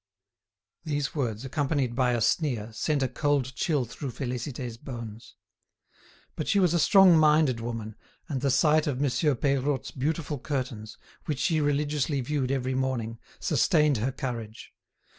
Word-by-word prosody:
These 145 -3 -2
words, 120 -5 -2
accompanied 140 -2 -1
by 125 -1 +2
a 120 - 0
sneer, 115 -3 0
sent 145 +4 0
a - - +2
cold 140 -1 0
chill 145 -3 0
through 130 +4 -6
Félicité's 125 0 -4
bones. 115 -3 -9 1.0
But 155 - -4
she - - +2
was 180 -4 +3
a 170 - +2
strong 190 +1 +7
minded 150 -5 +4
woman, 115 -2 -5 0.3
and 135 -4 -3
the 140 - +1
sight 150 +4 +3
of 135 -3 -1
Monsieur 140 +1 +1
Peirotte's 135 +1 0
beautiful 150 +1 -2
curtains, 125 -6 -4 0.3
which 150 - -2
she 155 +3 +1
religiously 145 0 0
viewed 130 0 -1
every 130 -1 -1
morning, 125 -4 -2 0.2
sustained 150 -3 +3
her 120 +5 -1
courage. 115 -4 -6
135 Hz, 145 wpm, -27 LUFS, 120-150 Hz, 1.0 s, strong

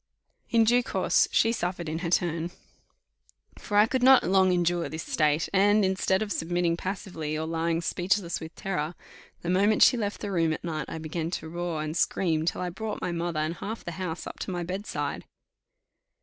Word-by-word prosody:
In 230 -1 +4
due 240 +3 +4
course 245 - +2
she 225 - +3
suffered 180 -6 -3
in 155 +1 -3
her 170 -1 -3
turn; 170 -1 0 1.1
for 205 - -2
I 210 - +7
could 255 +3 -1
not 265 +1 +7
long 190 0 +4
endure 175 -1 +1
this 160 +1 -5
state, 150 0 +1
and, 205 +1 +4
instead 190 +1 +1
of 210 - -6
submitting 175 0 0
passively 175 -5 -4
or 160 - -2
lying 165 +1 -1
speechless 175 +1 0
with 160 0 -9
terror, 170 -3 -3 0.5
the 175 - -3
moment 205 +4 +4
she 250 - +6
left 205 -2 -2
the 205 - -3
room 165 -3 +2
at - - -6
night 155 -4 -3
I - - -5
began 160 +1 -3
to 170 - -4
roar 170 -2 -3
and 155 +1 -4
scream 160 -2 +1
till - - -1
I 180 -1 -2
brought 215 +3 -5
my 180 - -2
mother 170 -2 -2
and 155 +2 -2
half 220 +2 -6
the 175 - -4
house 180 -2 -4
up - - -8
to - - -4
my 175 -2 -2
bedside. 190 +4 -4
175 Hz, 195 wpm, -27 LUFS, 165-195 Hz, 1.1 s, I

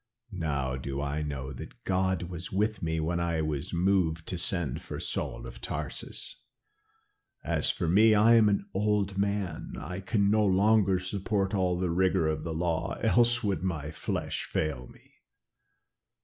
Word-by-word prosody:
Now 70 -7 -1
do 70 +1 -4
I 70 +1 -2
know 70 -3 -4
that 60 - -10
God 95 -1 +1
was 85 0 -6
with 105 +1 0
me 80 -1 -1
when 85 +2 -1
I 85 -2 0
was 75 -2 -3
moved 85 -3 +1
to 90 - -2
send 85 -7 -1
for - - -6
Saul - - -3
of - - -10
Tarsus. - - -5 1.0
As - - 0
for - - -1
me, 110 +6 +6
I 110 +3 +6
am 110 -2 +6
an 100 -1 0
old 100 -1 0
man. 100 -5 -2
I 90 +6 -5
can 100 +1 +1
no 110 0 +4
longer 100 0 +4
support 95 +2 -1
all 90 -3 +1
the 90 -1 0
rigor 95 -1 +2
of 80 0 -1
the 85 - -4
law, 80 0 -1
else 120 +1 +3
would 100 -6 0
my 80 -5 -3
flesh - - -3
fail 70 -5 -2
me. - - -20
90 Hz, 165 wpm, -29 LUFS, 80-100 Hz, 1.0 s, me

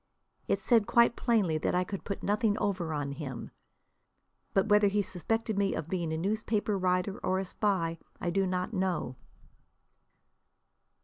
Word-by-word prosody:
It - - +2
said 230 -4 +3
quite 235 0 +4
plainly 200 -10 +1
that - - 0
I 180 - +3
could 195 +1 -6
put 200 - -5
nothing 210 +1 +1
over 185 -6 -1
on 145 -2 -2
him. 140 -4 -6 1.0
But 195 - +2
whether 210 -1 +5
he 205 +1 +1
suspected 220 +3 -2
me 200 -1 +1
of 160 0 -4
being 170 -4 -1
a 160 - -1
newspaper 210 +3 0
writer 185 +1 0
or 185 - 0
a 190 - -1
spy 180 -4 -1 0.2
I 175 - -1
do 195 +1 +1
not 180 +3 -2
know. 185 - -1
190 Hz, 160 wpm, -30 LUFS, 175-210 Hz, 1.0 s, whether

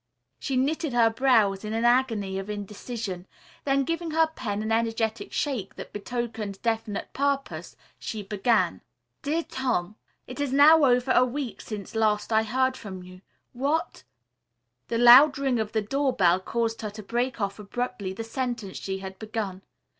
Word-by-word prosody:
She 270 -2 -2
knitted 300 +2 0
her 230 -2 +4
brows 225 -6 +3
in 215 0 -4
an 225 +1 0
agony 225 -6 +2
of 195 +2 -7
indecision, 205 -2 -5 0.4
then 275 0 +2
giving 330 +3 -2
her 320 +1 +3
pen 215 -10 -4
an 220 - -2
energetic 225 -1 -1
shake 255 -10 -2
that - - -9
betokened 220 -2 -4
definite 225 -3 -2
purpose, 280 0 -2 0.2
she 215 -2 -5
began: 210 +4 +1 0.4
"DEAR 320 +3 -1
TOM: 245 - -2 0.3
"It 250 +3 -9
is 285 -2 -1
now 295 +3 +7
over 250 0 +3
a 250 - +5
week 255 0 -4
since 205 -4 -7
last 220 0 +1
I 220 - +5
heard 260 +4 0
from 190 -6 -8
you. 185 0 -13 0.3
What 285 +6 -1 0.4
" - - -53
The 230 - -1
loud 250 +5 +8
ring 270 -4 0
of 220 -1 -2
the 220 -2 0
doorbell 210 -8 +2
caused 230 +3 -2
her 215 - -3
to 210 +1 -9
break 240 +5 -2
off 200 0 -2
abruptly 215 -1 -4
the 195 +4 -5
sentence 230 -4 -4
she 190 0 -4
had 190 0 -8
begun. 215 -4 -4
230 Hz, 165 wpm, -26 LUFS, 205-260 Hz, 0.4 s, loud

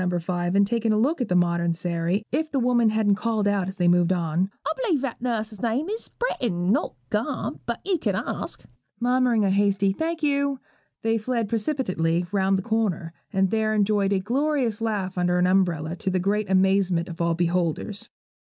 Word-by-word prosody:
5, 175 +1 -1
and 200 0 +5
taken 225 +1 0
a 215 - +2
look 275 +7 +1
at 245 - 0
the 180 - 0
modern 170 -1 +2
Sairy, 175 +4 -1
if 310 +4 0
the 285 - -2
woman 240 -2 +3
hadn't 215 -2 +2
called 220 -2 0
out 200 -3 +1
as 190 0 -6
they 175 -1 +2
moved 175 0 +4
on 175 +1 0 0.2
'I - - +1
b'lieve 350 - +1
that 270 -4 -4
nuss's 220 -4 -3
name 245 - 0
is 445 +2 -4
Britiain, 195 - -1
not 285 +8 0 0.2
Gamp; - - -2
but - - -3
you 375 -4 +1
can - - 0
ask.' - - -4 0.4
Murmuring 245 -3 +2
a 195 - +2
hasty 200 0 +2
'thank 325 +6 -3
you,' 280 -2 +1 0.4
they 225 0 +1
fled 230 0 -1
precipitately 190 - 0
round 195 -1 +2
the 190 - -3
corner, 200 -8 -1 0.2
and 190 -1 +1
there 220 -1 +1
enjoyed 205 -1 +2
a 200 - +3
glorious 250 0 0
laugh 195 -5 -2
under 180 0 +2
an 180 - +3
umbrella, 175 -4 +1
to 190 - -2
the 185 - 0
great 200 +2 0
amazement 190 -2 +2
of 170 0 -7
all 170 0 +1
beholders. 175 +3 -1
200 Hz, 190 wpm, -25 LUFS, 180-235 Hz, 0.4 s, and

